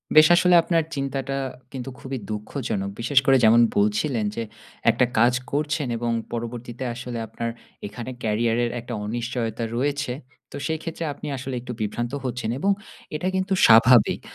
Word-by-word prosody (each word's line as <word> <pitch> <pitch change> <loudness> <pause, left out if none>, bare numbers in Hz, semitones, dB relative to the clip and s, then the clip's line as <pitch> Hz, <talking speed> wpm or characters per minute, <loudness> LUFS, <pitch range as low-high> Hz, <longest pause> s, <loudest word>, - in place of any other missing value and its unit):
বেশ 155 0 +9
আসলে 180 +1 +5
আপনার 165 -1 +2
চিন্তাটা 135 0 -2 0.4
কিন্তু 130 0 -6
খুবই 135 0 -5
দুঃখজনক। 105 -2 -3
বিশেষ 135 +4 +4
করে 135 0 +6
যেমন 115 +2 +7 0.2
বলছিলেন 105 +3 +1
যে 115 - -2 0.5
একটা 125 - +4
কাজ 120 +2 +5 0.2
করছেন 150 -1 -1
এবং 120 0 -1 0.2
পরবর্তীতে 120 +1 -5
আসলে 120 0 -6
আপনার 115 +2 -4 0.4
এখানে 120 +4 -7
Career 115 +1 +1
এর 120 - -2
একটা 120 +1 -7
অনিশ্চয়তা 115 0 -3
রয়েছে। 140 0 -1 0.4
তো - - -9
সেই 160 -1 -1
ক্ষেত্রে 165 0 -5
আপনি - - -8
আসলে 130 0 -5
একটু 125 0 -6
বিভ্রান্ত 120 +3 -2
হচ্ছেন 125 -3 -3
এবং 200 - +2 0.4
এটাই 185 +5 -1
কিন্তু 190 +1 0
স্বাভাবিক। 115 0 +6
125 Hz, 155 wpm, -24 LUFS, 115-140 Hz, 0.5 s, বেশ